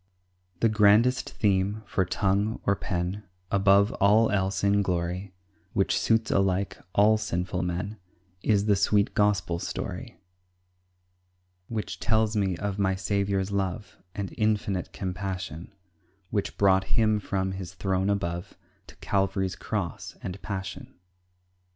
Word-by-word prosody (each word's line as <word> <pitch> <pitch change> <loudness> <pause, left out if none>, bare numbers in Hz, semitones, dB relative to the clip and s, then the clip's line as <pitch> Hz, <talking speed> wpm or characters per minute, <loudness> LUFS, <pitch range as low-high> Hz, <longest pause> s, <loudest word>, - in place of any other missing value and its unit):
The 115 - +5
grandest 110 +4 +4
theme, 100 +1 0
for 95 0 0
tongue, 100 +4 0
or 100 - +3
pen, 90 +2 -3 0.3
Above 100 +1 +4
all 105 +3 +5
else 100 -1 0
in 100 0 +4
glory; 90 +1 -2 0.4
Which 95 - +2
suits 115 -1 +2
alike, 95 0 +1 0.2
all 105 +2 +5
sinful 90 -3 -2
men, 90 +5 -3 0.4
Is 100 0 +2
the 105 -2 +4
sweet 100 +1 +2
Gospel 100 -5 +1
story, 85 - -5 1.5
Which 110 -2 -4
tells 110 0 +1
me 95 -4 +1
of 100 +1 -3
my 95 -1 +2
Saviour's 100 0 -1
love 100 0 -3 0.2
And 100 -2 -4
infinite 105 -4 0
compassion, 90 -2 -5 0.6
Which 100 -2 -2
brought 95 -1 +4
Him 110 -2 +3
from 95 -1 -2
His 95 -1 -7
throne 95 0 0
above 85 -3 -2 0.3
To - - -14
Calvary's 95 -1 0
cross 100 -6 -4
and 95 +2 -5
passion. 95 -2 -6
100 Hz, 125 wpm, -27 LUFS, 95-105 Hz, 1.5 s, The